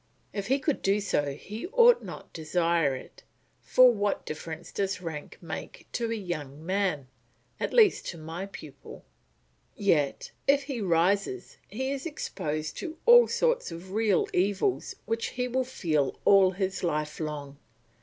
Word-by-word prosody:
If 200 -2 -3
he 265 +3 +3
could 280 +1 -1
do 200 +2 +2
so 145 -8 -1
he 210 - -7
ought 480 +3 +6
not - - -9
desire 165 -3 +1
it; 130 - -11 0.4
for 255 -1 +6
what 205 -2 -1
difference 160 +2 -7
does 195 -1 -1
rank 160 -4 -7
make - - -7
to 235 -1 -2
a - - 0
young 155 -7 -6
man, 185 -7 0 0.5
at - - -2
least 435 -5 +4
to 170 - -5
my 165 +4 -6
pupil? 155 - -11 0.7
Yet, 150 -8 +1 0.2
if 280 0 +4
he 270 -4 -4
rises 195 - +1
he 265 +5 -3
is 280 +3 -3
exposed 155 - -4
to 325 -3 -6
all 480 0 +8
sorts - - +1
of 170 +3 -9
real 210 -3 +2
evils 200 - 0
which 225 0 -1
he 250 0 -2
will 260 +1 0
feel 155 - -1
all 195 -2 +7
his 190 0 -2
life 150 -3 -1
long. 145 -3 -5
195 Hz, 155 wpm, -28 LUFS, 160-250 Hz, 0.7 s, all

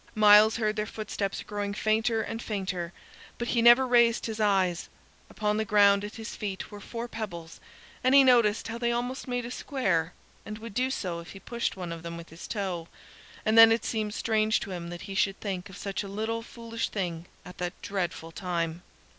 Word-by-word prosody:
Myles 215 0 +7
heard 215 -2 0
their 210 0 -1
footsteps 205 -2 -4
growing 205 -1 -4
fainter 220 +1 +1
and 225 0 -5
fainter, 185 -6 -3 0.5
but 240 - -3
he 235 - +2
never 240 +3 +7
raised 235 -2 +4
his 220 -1 -4
eyes. 190 -5 +1 0.4
Upon 210 0 -1
the 220 - +1
ground 200 -1 +4
at 210 - -6
his 225 -1 -7
feet 195 -2 -5
were 205 - -8
four 235 +3 -5
pebbles, 175 -8 -7 0.4
and 255 +2 +4
he 280 - +9
noticed 235 -5 +4
how 230 +1 -5
they 235 0 +1
almost 245 +3 -3
made 245 -1 -2
a 240 - -6
square, 185 - -1 0.3
and 215 - -7
would 225 -1 -9
do 255 +4 +1
so 180 -9 -3
if 170 - -10
he 195 - -10
pushed 235 -1 -3
one 180 -2 -5
of 165 -1 -6
them 170 0 -6
with 170 0 -10
his 165 +1 -10
toe, 185 -6 -3 0.6
and 220 0 +2
then 225 0 +10
it 225 - +1
seemed 215 -2 -2
strange 220 -1 +2
to 200 - -6
him 170 -2 -5
that 175 0 -7
he 195 - -7
should 195 0 +1
think 190 -2 -4
of 190 - -11
such 200 -1 -3
a 200 - -6
little 220 +3 -3
foolish 230 0 -5
thing 175 -4 -4 0.2
at 180 - -11
that 180 +1 -4
dreadful 175 -4 -3
time. 170 -2 -3
210 Hz, 205 wpm, -28 LUFS, 185-230 Hz, 0.6 s, then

